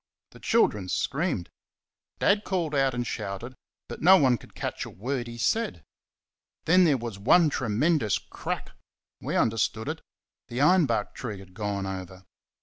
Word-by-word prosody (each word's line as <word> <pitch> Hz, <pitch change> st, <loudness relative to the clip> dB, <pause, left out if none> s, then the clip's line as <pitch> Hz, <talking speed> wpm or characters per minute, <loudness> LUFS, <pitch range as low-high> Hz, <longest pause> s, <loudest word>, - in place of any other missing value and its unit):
The -, -, -15 dB
children 105 Hz, -, +2 dB
screamed. 140 Hz, -, -1 dB, 0.7 s
Dad 205 Hz, +1 st, +3 dB
called 170 Hz, -5 st, -2 dB
and 135 Hz, -3 st, +1 dB
shouted, 105 Hz, +3 st, -5 dB, 0.3 s
but -, -, -8 dB
no 190 Hz, +4 st, +8 dB
one 130 Hz, -, +3 dB
could -, -, -17 dB
catch -, -, -4 dB
a -, -, -7 dB
word 120 Hz, +4 st, -4 dB
he 120 Hz, 0 st, -8 dB
said. 115 Hz, -, 0 dB, 0.8 s
Then 180 Hz, +3 st, +5 dB
there 150 Hz, -5 st, +3 dB
was 115 Hz, -4 st, -6 dB
one 150 Hz, -, +5 dB
tremendous 125 Hz, -, +1 dB
crack -, -, -6 dB, 0.5 s
we -, -, -3 dB
understood 110 Hz, 0 st, +1 dB
it 160 Hz, +1 st, -4 dB, 0.5 s
the 120 Hz, +1 st, -5 dB
iron 170 Hz, +2 st, +5 dB
bark 110 Hz, -4 st, -1 dB
tree 110 Hz, -5 st, -6 dB
had 95 Hz, -1 st, -14 dB
gone 100 Hz, -1 st, -3 dB
over. 95 Hz, -1 st, -7 dB
120 Hz, 150 wpm, -27 LUFS, 105-155 Hz, 0.8 s, no